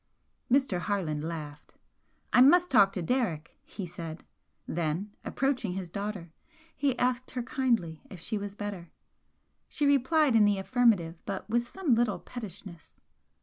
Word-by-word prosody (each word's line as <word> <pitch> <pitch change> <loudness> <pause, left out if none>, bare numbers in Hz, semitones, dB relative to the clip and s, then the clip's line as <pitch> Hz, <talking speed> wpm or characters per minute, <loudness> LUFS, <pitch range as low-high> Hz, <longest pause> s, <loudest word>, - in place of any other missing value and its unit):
Mr. 260 -9 +3
Harland 170 -6 -2
laughed. 155 -3 -7 0.6
"I 250 - +7
must 355 +7 +6
talk 200 -6 +6
to 180 - -3
Derrick," 180 - -1
he 195 - -7
said 165 -2 -7 0.4
then, 170 +5 -2
approaching 255 -8 -1
his 185 -2 -5
daughter, 200 -4 -5 0.4
he 275 -3 0
asked 250 0 0
her 250 -1 -4
kindly 235 - 0
if 185 - -10
she 210 +5 -3
was 200 0 -6
better. 200 -5 -6 0.8
She 295 - -1
replied 285 0 +3
in 215 -2 +6
the 205 -1 +3
affirmative, 195 -6 +2
but 195 -2 -4
with 240 +1 +1
some 360 -6 0
little 230 -3 +2
pettishness. 195 -7 -10
205 Hz, 145 wpm, -29 LUFS, 175-250 Hz, 0.8 s, I